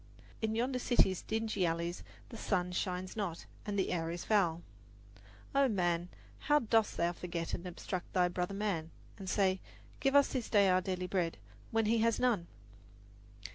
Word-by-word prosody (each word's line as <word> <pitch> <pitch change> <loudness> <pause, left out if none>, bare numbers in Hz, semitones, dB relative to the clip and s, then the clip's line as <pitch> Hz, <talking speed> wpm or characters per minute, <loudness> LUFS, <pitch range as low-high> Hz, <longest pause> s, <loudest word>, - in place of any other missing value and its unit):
In 220 0 0
yonder 250 +3 0
city's 195 -7 +3
dingy 220 -3 -1
alleys 170 +1 -1 0.3
the 235 - -9
sun 180 -5 0
shines 185 0 -2
not, 190 -6 -3 0.2
and 205 -1 -1
the 190 - +1
air 165 -2 -1
is 175 +1 -5
foul. 175 -6 +2 0.9
Oh, 275 0 +5
man, 175 -5 0 0.3
how 295 0 +3
dost 225 -5 +2
thou 170 +1 +2
forget 170 -1 -4
and 180 - -3
obstruct 180 +1 -5
thy 180 -1 +3
brother 180 +2 -2
man, 195 -6 -1 0.3
and 190 -1 -5
say, 190 -2 +2 0.4
"Give 270 0 +2
us 285 -1 +6
this 250 -4 -3
day 200 -3 +5
our 185 0 +4
daily 185 -1 -2
bread," 180 -2 -1 0.3
when 225 -1 +1
he 225 +2 +3
has 230 0 +2
none! 225 -9 +2
190 Hz, 170 wpm, -34 LUFS, 175-220 Hz, 0.9 s, us